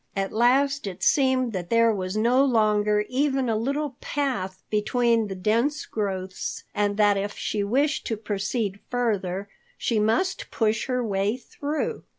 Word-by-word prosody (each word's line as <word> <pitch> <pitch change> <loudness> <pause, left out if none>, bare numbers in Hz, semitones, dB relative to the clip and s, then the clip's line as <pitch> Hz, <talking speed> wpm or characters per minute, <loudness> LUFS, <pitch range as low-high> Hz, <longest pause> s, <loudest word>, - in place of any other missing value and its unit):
At 195 0 -1
last 270 +3 +2
it 190 -1 -6
seemed 260 -4 +3
that 180 -3 -4
there 230 -1 +4
was 185 0 -3
no 245 +5 +4
longer 210 -4 +2
even 270 -1 0
a 225 - +1
little 275 +4 -2
path 220 -10 -2
between 230 +1 +2
the 195 - -5
dense 230 +10 0
growths 190 -3 -4
and 205 0 0
that 205 -1 +4
if 200 +1 -3
she 210 -1 -1
wished 280 +9 +1
to 225 - -2
proceed 205 0 -2
further, 200 -6 -1 0.3
she 230 -4 0
must 225 - 0
push 220 -1 0
her 250 -2 0
way 200 +2 0
through. 290 +4 -4
220 Hz, 155 wpm, -25 LUFS, 205-255 Hz, 0.3 s, there